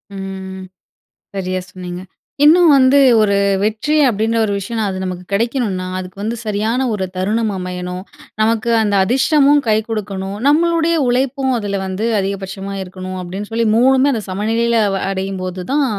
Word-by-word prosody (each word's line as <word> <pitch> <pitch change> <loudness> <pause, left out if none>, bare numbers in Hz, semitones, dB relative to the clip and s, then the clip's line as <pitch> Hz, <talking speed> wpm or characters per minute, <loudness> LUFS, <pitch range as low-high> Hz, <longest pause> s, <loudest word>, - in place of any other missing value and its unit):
ம், - - -6
ம். 190 -1 -7 0.7
சரியா 185 -1 -2
சொன்னீங்க. 180 -1 -7 0.4
இன்னும் 335 +3 +6
வந்து 270 +1 +5 0.2
ஒரு 200 -2 +2 0.3
வெற்றி 220 +8 0
அப்படின்ற 225 +1 0
ஒரு 205 - -2
விஷயனா 220 +3 -3
அது 190 - -4
நமக்கு 180 -1 -5
கிடைக்கணும்னா, 210 -4 -1
அதுக்கு 185 +1 -8
வந்து 220 +3 -2
சரியான 220 +5 -1
ஒரு 190 -2 -2
தருணம் 215 +4 0
அமையணும். 180 0 -5 0.4
நமக்கு 225 +1 +1
அந்த 205 -1 0
அதிர்ஷ்டமும் 280 +6 +3
கை 215 - +4
கொடுக்கணும். 200 -2 -4
நம்மளுடைய 335 +2 +3
உழைப்பும் 265 +2 0
அதுல 200 -3 -3
வந்து 190 +4 -3
அதிகபட்சமா 195 0 -4
இருக்கணும், 185 0 -7
அப்படின்னு 190 +4 -6
சொல்லி 230 +1 0
மூணுமே 265 +3 +4
அந்த 225 - -2
சமநிலையில 225 +4 0 0.3
அடையும்போது 190 -1 -4
தான். 285 0 +2
210 Hz, 145 wpm, -17 LUFS, 190-240 Hz, 0.7 s, இன்னும்